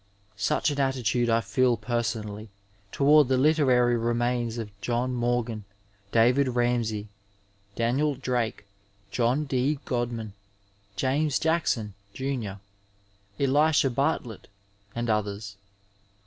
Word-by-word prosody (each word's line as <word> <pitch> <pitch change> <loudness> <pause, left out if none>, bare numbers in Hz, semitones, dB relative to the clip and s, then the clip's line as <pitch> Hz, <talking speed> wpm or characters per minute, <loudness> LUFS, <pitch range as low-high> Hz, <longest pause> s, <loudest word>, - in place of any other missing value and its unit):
Such 100 +9 +1
an 145 - -3
attitude 125 -3 +1
I 115 0 +3
feel 125 0 +2
personally 110 -2 -3 0.4
toward 145 0 +5
the 130 0 +2
literary 130 -4 +3
remains 120 0 0
of 110 -3 -5
John 125 +1 -1
Morgan, 120 -2 -1 0.5
David 125 +4 +4
Ramsay, 120 -3 0 0.7
Daniel 135 +6 +1
Drake, 125 -5 -2 0.5
John 125 +5 +1
D. 135 +2 0
Godman, 120 -4 -3 0.6
James 140 +6 +1
Jackson, 160 - 0 0.2
jimr., 125 -7 -3 0.8
Elisha 145 0 +3
Bartlett 125 -4 -2 0.5
and 120 0 -2
others.. 105 -1 -2
120 Hz, 100 wpm, -26 LUFS, 115-135 Hz, 0.8 s, toward